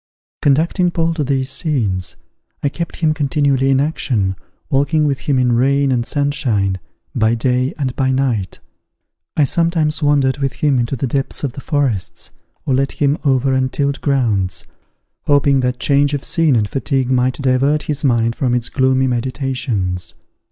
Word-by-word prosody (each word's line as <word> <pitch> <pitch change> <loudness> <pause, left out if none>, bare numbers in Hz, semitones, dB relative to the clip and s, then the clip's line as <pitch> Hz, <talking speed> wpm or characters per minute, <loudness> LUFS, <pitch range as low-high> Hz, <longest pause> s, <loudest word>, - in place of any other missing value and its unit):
Conducting 165 +6 +2
Paul 165 -1 0
to 160 -2 -2
these 135 -1 -1
scenes, 100 - -1 0.5
I 140 - +2
kept 170 +4 -5
him 155 -2 +1
continually 140 -2 +1
in 135 -1 +3
action, 120 -10 0 0.4
walking 145 +3 +2
with 140 -2 0
him 140 -3 0
in 125 -1 +2
rain 135 +3 +2
and 120 -2 +1
sunshine, 125 -10 0 0.3
by 110 +1 +2
day 125 +4 0
and 130 -4 -2
by 130 -1 +1
night. 130 -7 -1 0.8
I 150 - +4
sometimes 165 +1 +1
wandered 145 -2 +2
with 135 -1 -1
him 145 -4 +1
into 120 +3 -1
the 130 - -2
depths 135 +3 -2
of 135 -4 -2
the 140 - -8
forests, 130 - -2 0.3
or 135 - 0
led 135 +1 0
him 145 0 +1
over 135 -2 +2
untilled 135 +2 -1
grounds, 110 -10 0 0.6
hoping 140 -1 +3
that 125 0 -1
change 145 0 +2
of 140 - -5
scene 160 -5 +2
and 105 -3 +1
fatigue 135 +1 -1
might 125 0 +2
divert 140 +3 +1
his 150 -1 -3
mind 115 -3 +2
from 125 -2 0
its 125 0 -2
gloomy 130 -1 +2
meditations. 120 -7 -2
135 Hz, 160 wpm, -18 LUFS, 125-145 Hz, 0.8 s, I